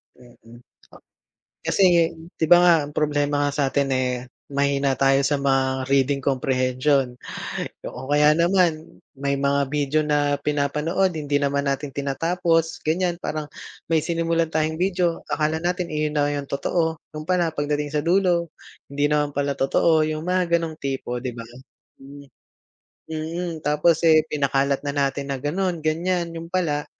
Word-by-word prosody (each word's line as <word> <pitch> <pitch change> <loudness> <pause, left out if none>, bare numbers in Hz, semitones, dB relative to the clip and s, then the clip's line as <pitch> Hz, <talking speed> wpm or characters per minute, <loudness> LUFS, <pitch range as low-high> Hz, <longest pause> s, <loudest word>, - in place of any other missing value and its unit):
Mm, 120 -1 -17 0.3
ah, - - -15 0.7
kasi 170 -4 +3 0.2
di 160 - +2
ba 175 - +8
nga, 175 -1 +7
ang 145 - -13
problema 145 -1 +1
nga - - -1
sa - - +3
atin, 140 0 0
eh, 130 -1 +1 0.4
mahina 140 -1 +1
tayo 135 0 +3
sa 145 +1 +1
mga 135 -1 0
reading 140 0 +2
comprehension, 130 0 +1 0.7
o 130 - -7
kaya 150 +1 +5
naman 170 -1 +1 0.2
may 140 0 0
mga 140 +1 +1
video 150 0 +1
na 145 -1 +1
pinapanood, 150 +6 0
hindi 145 -2 0
naman 140 0 0
natin 140 +1 -3
tinatapos, 165 +3 0
ganyan. 175 +1 0
Parang 155 -1 -3 0.5
may 160 - +4
sinimulan 165 0 0
tayong 160 0 -1
video, 180 -2 0
akala 155 +1 0
natin 175 0 -2
iyon 150 0 -1
na 145 0 +2
yung 140 -1 -4
totoo, 160 +3 -1 0.2
yun 155 - -5
pala 175 -3 +2
pagdating 145 0 -2
sa 150 - +1
dulo, 175 -1 +2 0.4
hindi 145 +1 0
naman 150 -1 0
pala 140 0 0
totoo, 155 +4 +3
yung 155 0 -3
mga 180 -2 +2
ganong 160 -2 -5
tipo, 135 -3 -3
'di 130 0 -3
ba? 115 -1 -7 0.6
Hmm. 140 +1 -12 0.8
Mm, 160 +1 -4
tapos, 150 +2 +3
eh, 155 -1 +6
pinakalat 140 -1 +1
na 140 - -2
natin 140 0 -1
na - - -3
ganon, 175 +3 -1
ganyan, 170 +2 0
yun 165 0 -7
pala 160 -5 -1
150 Hz, 155 wpm, -23 LUFS, 140-165 Hz, 0.8 s, ba